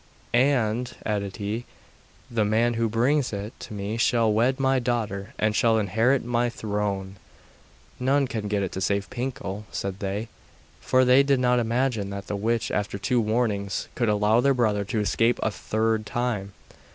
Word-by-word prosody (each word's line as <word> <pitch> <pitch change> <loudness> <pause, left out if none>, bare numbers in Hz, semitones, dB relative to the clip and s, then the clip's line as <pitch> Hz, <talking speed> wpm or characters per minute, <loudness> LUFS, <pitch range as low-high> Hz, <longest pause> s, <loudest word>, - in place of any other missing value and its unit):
'And,' 125 -2 +2
added 100 -2 -2
he, 105 +4 -3 0.7
'the 115 -2 +1
man 115 +3 +2
who 115 -1 0
brings 130 +5 +1
it 105 +3 -5
to - - -9
me 100 +2 -3
shall 115 -1 +3
wed 125 +5 +2
my 135 -1 +3
daughter, 110 -5 -2
and 110 0 +1
shall 115 0 +3
inherit 110 +6 +2
my 120 0 +1
throne.' 100 -3 -3 0.8
'None 135 +2 +2
can 110 -5 -4
get 100 -1 0
it 95 - -4
save 100 0 -1
Pinkel,' 105 -5 -4
said 100 0 -4
they; 100 +3 -3 0.5
for 130 0 +3
they 125 +2 +6
did 140 -1 +2
not 125 -1 +3
imagine 115 -3 0
that 100 0 -6
the 105 - -3
witch, 115 +3 -1
after 105 -1 -2
two 120 +5 +1
warnings, 105 -3 -1
could 120 -3 0
allow 105 +2 +3
their 140 +1 +3
brother 105 -4 +1
to 110 - -2
escape 115 +4 +2
a 110 - +1
third 110 +1 -1
time. 110 -5 -2
110 Hz, 165 wpm, -25 LUFS, 105-120 Hz, 0.8 s, they